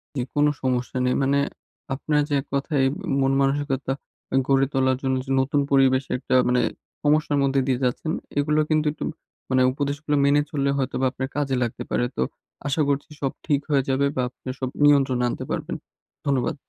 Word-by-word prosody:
জি 130 - 0
কোন 145 0 +4 0.2
সমস্যা 125 0 -1
নেই। 125 - +2
মানে 140 +1 +2 0.6
আপনার 150 +2 +1
যে - - -1
এক - - -17
কথায় 140 0 +1 0.4
মন-মানসিকতা 135 0 +1 0.5
গড়ে 135 0 +4
তোলার 130 -1 +2
জন্য 130 0 +1
যে 135 - -5
নতুন 140 +2 +1
পরিবেশের 135 -1 +3
একটা 130 - 0
মানে 125 0 +3 0.4
সমস্যার 150 -1 +2
মধ্যে 135 0 +2
দিয়ে 130 -1 +1
যাচ্ছেন 140 +6 -1 0.3
এগুলো 150 +1 +2
কিন্তু 155 0 +2
একটু 155 - -7 0.5
মানে 130 0 +3
উপদেশগুলো 145 +2 -2
মেনে 145 +1 +4
চললে 140 -1 0
হয়তো 135 -2 -1
বা 135 - +3
আপনার 130 0 -4
কাজে 140 -3 0
লাগতে 120 - -4
পারে। 120 - +1
তো - - -1 0.5
আশা 145 +3 +1
করছি 140 +1 -1
সব 135 - 0
ঠিক 145 -3 +2
হয়ে 140 -2 +3
যাবে 135 +1 +2
বা 130 - +1
আপনি 130 - -17
সব 130 -1 -2 0.2
নিয়ন্ত্রণে 135 -4 +4
আনতে - - -4
পারবেন। - - -3 0.5
ধন্যবাদ। 135 -3 +1
135 Hz, 175 wpm, -24 LUFS, 130-145 Hz, 0.6 s, কোন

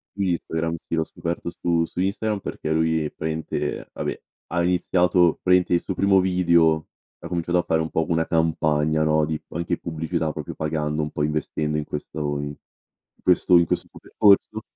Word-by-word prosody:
Su 100 - -9
Instagram, 85 -2 -1
sì, 85 - -7
l'ho 80 -1 +1
scoperto 85 +2 -5
su 85 -1 0
su - - -11
Instagram, 100 +2 -1
perché 80 - -5
lui, 80 -1 +1
praticamente 80 0 -3
vabbè, - - -4 0.3
ha 85 +1 0
iniziato 90 -1 +2
praticamente, 90 -1 +3
il 85 - +4
suo 95 - -4
primo 95 0 +4
video 85 -4 +3 0.3
ha - - -8
cominciato 85 0 -1
a 85 - +2
fare 80 - +1
un 80 - -2
po' 80 - 0
una 80 -1 +1
campagna, 80 -2 +1
no, 80 0 +3
di 80 0 -3
p - - -36
anche 85 +1 -2
pubblicità, 80 0 -2
proprio, 75 -2 -6
pagando, 75 -1 -2
un 75 0 -2
po' 75 - -3
investendo 75 0 -1
in 75 - -2
questo 75 +1 -6
o 75 -1 -1
in 75 0 -5 0.6
in - - -34
questo 90 0 +4
in 85 - +6
questo, - - -1
poi, - - -14
percorso. 110 +1 +3
80 Hz, 190 wpm, -23 LUFS, 80-90 Hz, 0.6 s, in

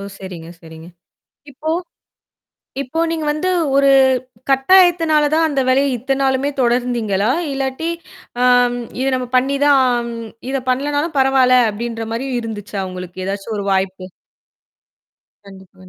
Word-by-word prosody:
ஓ! - - -7 0.2
சரிங்க 175 -4 -9
சரிங்க. 160 0 -12 0.6
இப்போ 285 +3 -7 1.1
இப்போ 280 +5 -4
நீங்க 320 -2 -3
வந்து, 305 +5 -2 0.3
ஒரு 275 0 +4 0.6
கட்டாயத்தினால 325 +1 +4
தான் 320 +1 +3
அந்த 280 -3 0
வேலைய 270 +2 +3
இத்தனை 270 +3 -2
நாளுமே 265 +1 +1
தொடர்ந்தீங்களா? 235 -4 0 0.2
இல்லாட்டி, 270 +3 -3 0.6
ஆம், 245 -1 +4 0.3
இது 265 - 0
நம்ம 255 -1 -3
பண்ணி 270 +2 +2
தான், 285 -1 +5 0.2
ஆம், 240 -1 -2 0.4
இதை 270 0 -1
பண்ணலனாலும் 290 +5 -1
பரவாயில்ல 260 -1 +4
அப்படின்ற 225 +1 -5
மாரி 260 +4 -3
இருந்துச்சா 210 -3 -6
உங்களுக்கு 185 0 -7
ஏதாச்சும் 200 +3 -4
ஒரு 200 - -4
வாய்ப்பு? 190 -1 -1 1.4
கண்டிப்பா. 190 -1 -15
255 Hz, 125 wpm, -18 LUFS, 205-275 Hz, 1.4 s, தான்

